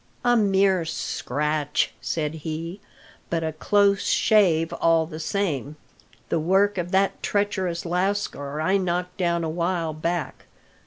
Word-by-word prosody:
"A 245 0 +5
mere 195 -4 +3
scratch," 150 -2 -1
said 155 -2 -2
he; 165 +5 -5 0.5
"but 165 -1 -1
a 160 -1 -2
close 200 +4 +2
shave 175 -7 +3
all 165 -1 +4
the 155 -1 -8
same. 155 -5 -2 0.5
The 165 - +1
work 195 +4 +2
of 175 0 -3
that 195 +1 +1
treacherous 190 -4 -1
lascar 180 -5 -1
I 190 +5 +2
knocked 180 -1 -2
down 170 -2 0
a - - -1
while 170 0 -1
back. 165 +2 -3
170 Hz, 135 wpm, -24 LUFS, 160-195 Hz, 0.5 s, A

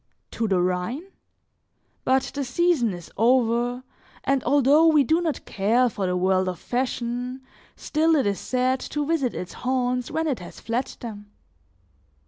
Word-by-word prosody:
To 225 - -1
the 190 -3 +2
Rhine? 180 - -1 1.0
But 265 0 +3
the 285 - -2
season 265 -2 +2
is 175 -2 -9
over, 240 +1 +2 0.4
and 275 -1 +1
although 290 +3 +5
we 305 -3 +5
do 320 +6 +2
not 320 -4 -2
care 230 +6 +2
for 200 -4 -3
the 180 0 0
world 185 0 +2
of 180 - -5
fashion, 250 +2 -3 0.3
still 320 +1 +1
it 280 - +2
is 200 -1 0
sad 255 +1 0
to 295 +2 -3
visit 285 -6 0
its 180 - -6
haunts 250 -1 -1
when 320 0 -1
it 285 -6 -1
has 175 - -10
fled 235 +3 -3
them. 210 -3 -8
250 Hz, 155 wpm, -24 LUFS, 215-275 Hz, 1.0 s, although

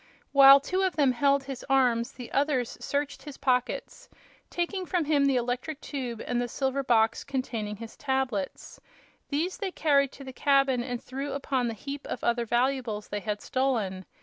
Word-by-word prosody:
While 275 0 +9
two 370 +7 -1
of 380 -2 +1
them 280 -4 +4
held 275 +3 +2
his 270 -2 -7
arms 245 -3 +2
the 245 -2 -9
others 275 -4 0
searched 285 0 -2
his 290 -3 -9
pockets, 255 - -1 0.4
taking 365 +2 -2
from 350 -4 0
him 285 -2 +3
the 275 -1 +3
electric 250 +5 -2
tube 250 -7 -5
and 245 -1 0
the 245 - -1
silver 265 +2 -1
box 225 -3 +2
containing 230 -6 -3
his 225 +2 -10
tablets. 265 -8 -3 0.5
These 320 +6 -1
they 405 -5 -2
carried 280 -6 +2
to 275 - -11
the 260 -1 -8
cabin 275 -2 +3
and 245 0 -4
threw 275 +2 -5
upon 270 -3 -1
the 230 - -3
heap 280 +5 -7
of - - -5
other 235 0 +1
valuables 240 -3 0
they 205 - -2
had 210 0 -3
stolen. 220 -8 -1
265 Hz, 175 wpm, -28 LUFS, 240-280 Hz, 0.5 s, While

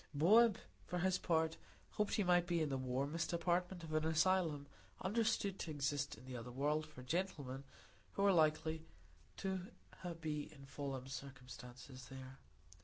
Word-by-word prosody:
Bob, 215 +8 +7 0.3
for 180 - -2
his 185 +1 +2
part, 160 -1 +2 0.3
hoped 210 -1 +1
he 210 - +3
might 175 -1 +4
be 175 -1 +2
in 155 -2 +1
the 135 - 0
warmest 140 +6 -1
department 175 +1 0
of 155 -1 -6
an 155 0 +2
asylum 160 -2 +3 0.4
understood 205 -2 +1
to - - -3
exist 145 -1 -1
in 120 - -13
the 130 -1 -6
other 120 0 -5
world 150 +5 0
for 130 -4 -11
gentlemen 140 -4 -2 0.5
who 200 - +2
are 200 - +6
likely 160 -1 +3 0.5
to 190 -1 -1 0.6
be 150 -2 -3
in 140 -3 -12
fallen 135 -2 -4
circumstances 130 -1 -8
there. 130 0 -9
155 Hz, 155 wpm, -39 LUFS, 135-175 Hz, 0.6 s, Bob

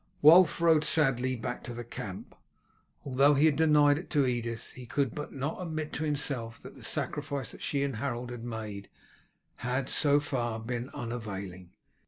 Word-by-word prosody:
Wulf 165 +2 +7
rode 165 -2 +4
sadly 135 -5 +2
back 120 +1 -5
to 120 - -6
the 120 - -5
camp. 100 -4 -8 0.7
Although 140 +2 +4
he 145 +3 +4
had 155 -3 +4
denied 150 -2 +4
it 175 - -10
to 145 -4 +2
Edith, 115 -2 -3
he 125 -1 -11
could 135 -2 0 0.2
not 140 +3 -3
but - - -7
admit 155 -3 -4
to 155 - -2
himself 140 -6 -2
that - - -10
the - - -15
sacrifice 140 -2 -1
that - - -12
she 140 -1 0
and 135 -5 -2
Harold 125 -1 -3
had 120 -2 -7
made 110 -4 -6 0.7
had, 125 +1 -2
so 145 -1 +3
far, 120 -6 -2
been 120 +2 -4
unavailing. 100 -6 -6
130 Hz, 175 wpm, -30 LUFS, 120-145 Hz, 0.7 s, Wulf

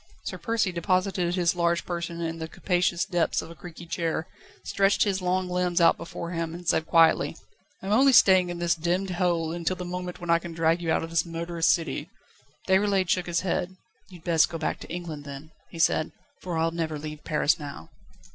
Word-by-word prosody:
Sir - - -5
Percy 225 -4 0
deposited 180 0 0
his 175 -2 +2
large 170 0 +1
person 170 -1 -4
in 165 0 -3
the 160 - -4
capacious 175 +1 0
depths 175 -4 0
of - - -10
a - - -11
creaky 170 0 -10
chair, 165 -1 -2 0.4
stretched 195 0 +2
his 195 -2 -1
long 185 +1 0
limbs 180 -1 0
out 170 - +6
before 170 0 -7
him, 165 -1 -3
and 175 -1 -10
said 160 -1 +1
quietly: 165 -1 +4 0.5
"I - - -7
am 200 - 0
only 270 +5 +6
staying 185 -6 +6
in 175 - -4
this 170 0 +1
demmed 175 +3 -1
hole 175 -3 0
until 170 +2 -1
the 180 - -6
moment 180 0 -5
when 175 -1 -2
I 170 - +5
can 170 0 -8
drag 165 +1 +1
you 165 -1 -1
out - - +1
of 165 - -6
this 165 - +2
murderous 170 0 -2
city." 165 -1 0 0.6
Déroulède 190 -1 +2
shook 180 0 +1
his 170 -1 0
head. 185 0 -2 0.3
"You'd 175 -4 -14
best 165 -3 +3
go 165 - -4
back 160 - -2
to - - -11
England, 165 -4 -5
then," 140 +2 -9 0.2
he 170 - -10
said, 160 -1 +2 0.3
"for 175 -3 -3
I'll 165 +1 +1
never 160 -2 -3
leave 150 0 -7
Paris 155 +1 +1
now." 140 - -8
170 Hz, 210 wpm, -26 LUFS, 165-180 Hz, 0.6 s, out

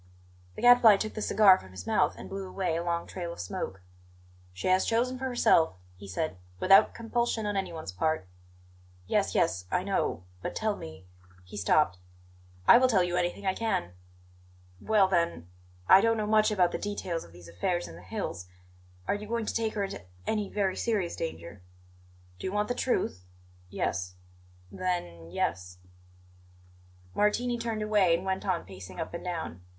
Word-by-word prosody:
The - - -8
Gadfly 245 -4 +8
took 215 +2 -3
the 215 - -5
cigar 200 -3 +6
from 95 - -14
his 95 -1 -9
mouth - - +2
and - - -8
blew 195 -1 -6
away 185 -4 -1
a 170 - -1
long 170 -1 -1
trail 175 -2 -5
of - - -10
smoke. 90 +1 -5 0.7
"She 90 - -5
has 185 0 +4
chosen 250 +3 0
for 265 - -3
herself," 240 - +3 0.2
he 100 +2 -11
said, 100 - -3 0.2
"without 195 - +6
compulsion 230 -1 -1
on 205 0 -1
anyone's 170 - -4
part." 155 - -1 0.8
"Yes, - - 0
yes 90 0 +1
I 180 - 0
know. 190 - -1 0.2
But - - -4
tell 215 -1 0
me 80 - -10 0.2
" 90 0 -25
He 90 - -11
stopped. 105 -2 +2 0.7
"I - - +9
will 255 - +5
tell 200 -7 +3
you 175 0 -1
anything 180 +3 -1
I 190 - +2
can." 220 - -1 0.9
"Well, 210 -3 +4
then 170 - 0 0.4
I 190 - +8
don't 230 +1 +2
know 215 - -1
much 215 0 +4
about 185 -5 +2
the - - -3
details 190 -5 -3
of - - -15
these 85 0 -14
affairs 175 - -2
in 80 - -11
the 85 - -12
hills, 90 0 -5 0.6
are - - +2
you 205 +1 -5
going 230 0 -2
to - - -2
take 225 -1 -1
her 205 - 0
into 195 - -5 0.2
any 210 -2 -1
very 195 -3 0
serious 205 -7 -1
danger?" 95 - -6 0.8
"Do - - -4
you - - -3
want 210 +2 0
the - - +1
truth?" 245 - -1 0.5
"Yes." 90 0 -2 0.6
"Then 85 - -3
yes." 90 +1 -2 1.4
Martini 240 +4 +1
turned 225 -2 -2
away 205 -5 +3
and 175 +3 -5
went 190 +1 -2
on 180 -3 0
pacing 95 -1 -10
up - - -4
and 170 - -6
down. 165 - -5
185 Hz, 180 wpm, -29 LUFS, -, 1.4 s, I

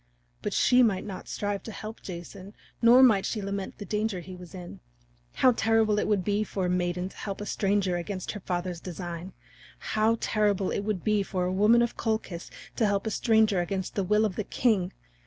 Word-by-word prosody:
But - - -2
she 250 0 +4
might 210 -6 +2
not 195 -3 -7
strive 205 -1 -2
to 225 - -8
help 215 +1 -8
Jason 185 +3 -9 0.3
nor 245 +2 +7
might 215 -7 +5
she 215 - -2
lament 200 -1 -4
for - - -34
the 205 - -7
danger 210 -1 -1
he 185 +1 -9
was 180 0 -11
in. 175 - -9 0.5
How 255 - +5
terrible 225 -2 +2
it - - 0
would 205 -3 +1
be 205 +3 +1
for 195 -3 -3
a - - 0
maiden 180 0 -1
to - - -17
help 195 -2 -5
a 205 - -5
stranger 195 -3 0
against 185 +1 -4
her 210 - -6
father's 180 -2 -3
design! 175 0 -6 0.6
How 220 +1 +3
terrible 205 -3 +1
it - - -1
would 205 -2 -2
be 210 -1 +2
for 185 -2 -2
a 180 - -1
woman 215 +5 +5
of 235 - -3
Colchis 220 -6 -3 0.3
to 220 - +3
help 200 0 0
a 220 - -1
stranger 220 -3 +3
against 190 +1 -3
the 200 - 0
will 210 +3 +3
of 195 -4 -3
the 215 - -1
king! 200 -5 +1
200 Hz, 210 wpm, -28 LUFS, 185-215 Hz, 0.6 s, nor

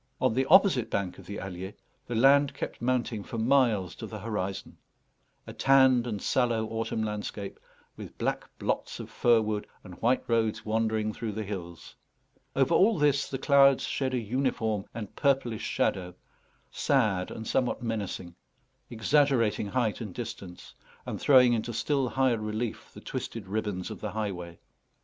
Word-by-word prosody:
On - - +2
the 130 +2 +1
opposite 170 - +5
bank 95 -4 -2
of - - -14
the 100 - -5
Allier 95 +1 -7 0.3
the 120 - -3
land 140 +4 +5
kept - - -6
mounting 120 -3 0
for 115 - -6
miles 115 - +2
to - - -6
the - - -7
horizon: 100 -3 -4 0.7
a - - -8
tanned 130 -3 +4
and 105 -4 -3
sallow 115 -1 +1
autumn 115 0 -2
landscape, 105 -1 -5 0.4
with - - -10
black - - -2
blots - - -2
of - - -8
fir 120 -2 +4
wood 105 -1 -3 0.2
and 90 -1 -12
white 125 +3 +2
roads 115 -2 0
wandering 110 -1 0
through 110 -1 -4
the 110 +1 -3
hills. 85 -5 -7 0.6
Over 135 +5 +2
all 205 +5 +4
this 145 -2 +2
the 135 - -3
clouds 140 -1 +5
shed 130 -2 -1
a - - +1
uniform 110 -3 -1
and 110 -3 -7
purplish 135 -6 +1
shadow, 90 -1 -1 0.6
sad 105 -10 +1
and 110 - -7
somewhat 125 +1 0
menacing, 100 -6 -4 0.6
exaggerating 115 -2 +2
height 120 0 -1
and 105 -6 -6
distance, 95 -6 -8 0.3
and - - -5
throwing 125 -3 +6
into 115 +1 -2
still 130 +3 0
higher 130 -3 +1
relief 110 +2 -4
the - - -12
twisted 115 -4 -5
ribbons 100 -2 -3
of - - -8
the 105 - -4
highway. 90 -6 -4
115 Hz, 160 wpm, -28 LUFS, 105-130 Hz, 0.7 s, throwing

